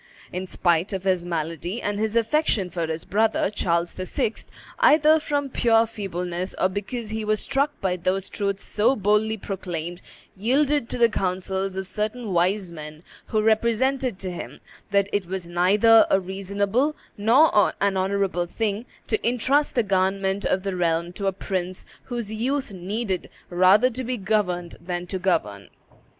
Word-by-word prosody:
In 185 +1 -4
spite 175 +2 +1
of 190 -1 -3
his 185 -2 0
malady 170 +4 -3
and 205 -2 -2
his 220 0 -1
affection 230 - +1
for 170 -2 -2
his 160 0 -4
brother, 215 -1 +1
Charles 170 -4 0
VI., 185 +4 -2 0.5
either 315 -9 +6
from 290 -2 -1
pure 230 -2 +4
feebleness 180 -4 -4
or 185 - +3
because 210 +3 -5
he 220 0 -3
was 215 0 +1
struck 280 +2 0
by 185 -2 0
those 185 +2 -1
truths 200 -1 -2
so 225 +6 +2
boldly 210 +1 +1
proclaimed, 175 -4 -5 0.3
yielded 265 +5 +1
to - - -2
the 235 -1 +6
counsels 190 -1 -2
of 190 -1 -2
certain 215 +2 -3
wise 180 +2 +1
men 155 0 -9 0.2
who 215 -1 0
represented 235 +2 +1
to 185 -1 -4
him 175 - -7 0.3
"that 200 -1 +2
it 205 -3 0
was 185 -1 -4
neither 200 +6 +5
a 195 - +4
reasonable 200 +9 -1 0.2
nor 225 0 +4
an 200 -1 +1
honorable 190 -2 0
thing 215 +4 -2 0.2
to 220 - -1
intrust 260 +5 +1
the 240 - +3
government 195 0 0
of 185 - +1
the 195 -2 -2
realm 170 0 0
to 195 +1 -3
a - - +3
prince 185 -1 -4 0.2
whose 235 -4 -4
youth 260 +1 -2
needed 190 +1 -3 0.2
rather 190 +8 +5
to 255 +2 -4
be 250 +1 -2
governed 190 -4 -1
than 175 0 -4
to 185 +1 -4
govern." 105 - -1
195 Hz, 160 wpm, -24 LUFS, 180-225 Hz, 0.5 s, either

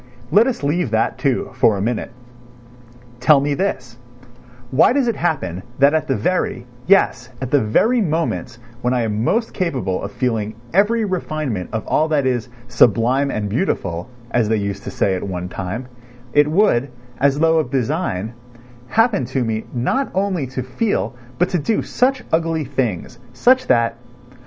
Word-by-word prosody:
Let 220 +5 +5
us 250 - -3
leave 150 0 0
that, 110 +2 0
too, 130 -1 0
for 115 -5 +3
a - - -3
minute. 120 +1 -2 1.1
Tell 140 +3 +5
me 145 +1 0
this: 125 -9 -3 0.7
why 140 - +5
does 270 -2 +1
it 230 - +1
happen 95 - -2 0.2
that 140 +2 +5
at 160 - 0
the 135 - +1
very, 175 -8 -1 0.2
yes, 125 -11 +3
at 130 -2 -5
the 145 - +4
very 225 - +2
moments 160 - -2 0.2
when 125 +1 +1
I 120 - +1
am 110 0 -1
most 225 - 0
capable 130 - -1
of 100 - -5
feeling 110 -3 -2 0.2
every 215 +4 +3
refinement 155 - -3
of 110 -1 -3
all 155 - +2
that 150 -3 +1
is 125 -2 -1 0.2
"sublime 120 +3 +3
and 105 -5 -2
beautiful," 100 - -2 0.2
as 115 -3 +1
they 110 - +2
used 100 -1 -4
to - - -4
say 95 - 0
at 95 - -2
one 90 -2 -4
time, 95 +7 -5 0.5
it 145 0 +5
would, 150 - +2 0.3
as 140 +1 +3
though 160 +1 +3
of 155 - -2
design, 130 - -1 0.5
happen 225 - +2
to 130 +1 -1
me 110 -1 -2
not 140 - 0
only 190 -7 0
to 130 0 -4
feel 200 - -1 0.2
but 180 +1 +2
to 180 - 0
do 215 +9 0
such 255 +1 0 0.2
ugly 160 -2 -2
things, 125 -9 -3
such 255 - +3
that 115 -2 +2
130 Hz, 170 wpm, -20 LUFS, 115-175 Hz, 1.1 s, Let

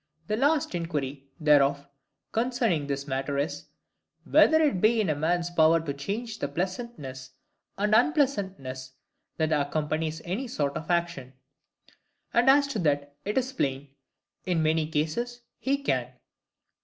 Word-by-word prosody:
The 210 - -1
last 285 +2 +2
inquiry, 145 -5 -3
therefore, 140 -2 +4 0.5
concerning 225 - 0
this 140 0 -3
matter 135 +1 -2
is,—Whether 165 - 0
it 290 - +2
be 225 +2 +4
in 205 -6 +1
a - - 0
man's 170 +3 0
power 165 -1 +5
to 155 -3 -4
change 215 - -4
the - - -1
pleasantness 175 - -5 0.5
and 210 +2 +1
unpleasantness 195 - +1 0.4
that 160 -1 0
accompanies 155 +2 -1
any 210 +10 -3
sort 145 - -2
of 160 - -6
action? 170 -7 -1 1.0
And 240 +3 +4
as 285 +1 +6
to 260 - -2
that, 145 -3 0
it 210 +4 -2
is 260 0 0
plain, 135 - -2 0.5
in 170 -3 0
many 155 0 +2
cases 165 +11 -2 0.2
he 275 +1 +1
can. 125 - 0
165 Hz, 135 wpm, -27 LUFS, 145-225 Hz, 1.0 s, as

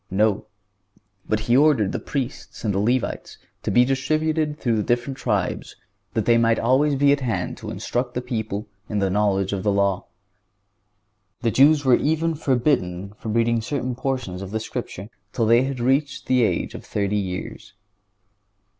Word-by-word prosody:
No; 105 +2 +1 0.8
but 110 0 +1
He 120 +3 +2
ordered 135 -8 +4
the - - -3
Priests 135 -4 -5
and 105 -3 0
the 95 - 0
Levites 120 +4 -1 0.2
to - - -3
be 120 +5 +5
distributed 155 +3 0
through 120 -7 0
the - - +1
different 120 +5 -1
tribes, 105 -8 -2 0.4
that - - 0
they 115 -1 +4
might 115 -1 +3
always 140 +4 +2
be 140 +1 +4
at 145 - +3
hand 110 -9 -2
to - - -7
instruct 125 0 -3
the 125 - -1
people 110 -4 -4 0.2
in 105 - -2
the 100 -2 +1
knowledge 100 -1 +1
of 100 - -2
the 105 - +1
law. 100 -1 +1 1.4
The 115 - +1
Jews 145 +3 +5
were 130 -2 +6
even 160 +2 0
forbidden 120 - 0
to 110 - -5
read 115 +1 +1
certain 130 0 -2
portions 125 -8 -3
of 95 - -6
the 110 +2 -2
Scripture 100 -2 -6 0.3
till 115 - +1
they 115 +3 +4
had 135 -2 -4
reached 135 +4 0
the 130 -1 +3
age 90 -7 0
of - - -8
thirty 100 0 -2
years. 95 -2 -5
120 Hz, 170 wpm, -23 LUFS, 105-135 Hz, 1.4 s, were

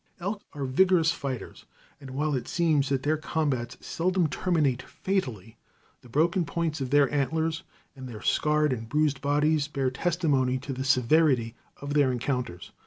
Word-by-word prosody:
Elk 200 +4 -3
are 145 -2 -4
vigorous 165 +4 +3
fighters, 135 -7 -6 0.3
and 135 -2 -10
while 145 +3 -1
it 130 - -2
seems 155 -5 +1
that 135 -2 0
their 155 +2 +1
combats 140 -5 -2
seldom 180 +1 +1
terminate 150 -6 0
fatally, 120 - -3 0.4
the 125 - -16
broken 165 +8 +2
points 160 -2 -2
of 130 - -2
their 145 0 +5
antlers, 160 +3 0 0.3
and 130 -2 -8
their 110 -2 -9
scarred 150 -2 +2
and 115 -2 -6
bruised 150 -1 +1
bodies, 145 +1 +2
bear 135 -4 -1
testimony 140 -4 +1
to 135 +1 -6
the 130 +1 -4
severity 130 -2 +3 0.2
of 140 0 -5
their 145 -3 +3
encounters. 125 -6 -3
145 Hz, 160 wpm, -27 LUFS, 130-160 Hz, 0.4 s, their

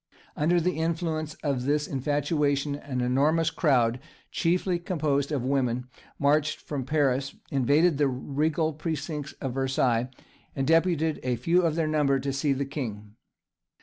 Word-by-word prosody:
Under 170 +4 +2
the 175 0 -1
influence 160 -1 -2
of 135 -4 -1
this 150 +1 +1
infatuation, 145 +1 0
an 140 -3 -4
enormous 145 +6 +2
crowd, 125 -6 +2 0.3
chiefly 180 +1 +1
composed 155 -5 -1
of 140 -5 -1
women, 125 -2 0 0.3
marched 150 +1 +2
from 140 -4 -5
Paris, 135 -3 +1 0.2
invaded 145 +4 +3
the 145 - +4
regal 150 +5 -1
precincts 150 -1 -4
of 130 -2 -5
Versailles, 130 -2 +1 0.5
and 135 - -1
deputed 165 0 +2
a 125 -1 0
few 165 +10 +2
of 165 -3 +1
their 165 -1 +1
number 145 -3 +2
to 135 +1 -2
see 140 +1 0
the 140 +1 0
king. 110 -7 -6
145 Hz, 145 wpm, -27 LUFS, 135-160 Hz, 0.5 s, the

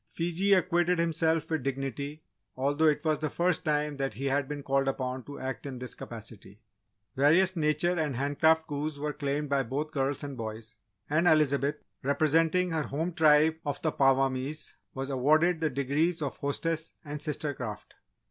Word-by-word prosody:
Fiji 175 +4 +1
acquitted 180 -1 +2
himself 165 -1 +1
with 160 -2 0
dignity, 135 +3 -4 0.3
although 145 +4 +2
it 150 +1 +1
was 155 -1 +2
the 155 - -1
first 175 +1 0
time 150 -1 0
that 135 -6 -2
he 135 +5 -4
had 135 0 +1
been 145 0 -5
called 135 0 +1
upon 130 -1 -2
to 145 - -8
act 130 +2 -5
in 130 -2 -6
this 125 0 -6
capacity. 110 -3 -10 0.6
Various 170 +8 +4
Nature 160 +2 +1
and 150 -4 -1
Handcraft 160 +4 +2
coups 150 0 -3
were 150 +1 -3
claimed 145 0 -2
by 140 -1 +2
both 140 +5 -3
girls 140 -2 -1
and 140 -1 -5
boys, 110 -1 -7 0.3
and 155 +4 +2
Elizabeth, 150 -2 +3 0.3
representing 165 +5 +2
her 160 -1 0
home 160 +5 -3
tribe 155 0 +5
of 145 -2 -3
the 160 - +2
Apawamis, 135 +2 +1 0.2
was 135 +1 -3
awarded 155 +6 +3
the 160 -1 +1
Degrees 150 +5 0
of 140 - -3
Hostess 160 +3 -2
and 145 0 -6
Sister 150 -1 -2
Craft. 115 -6 -7
150 Hz, 170 wpm, -29 LUFS, 135-160 Hz, 0.6 s, tribe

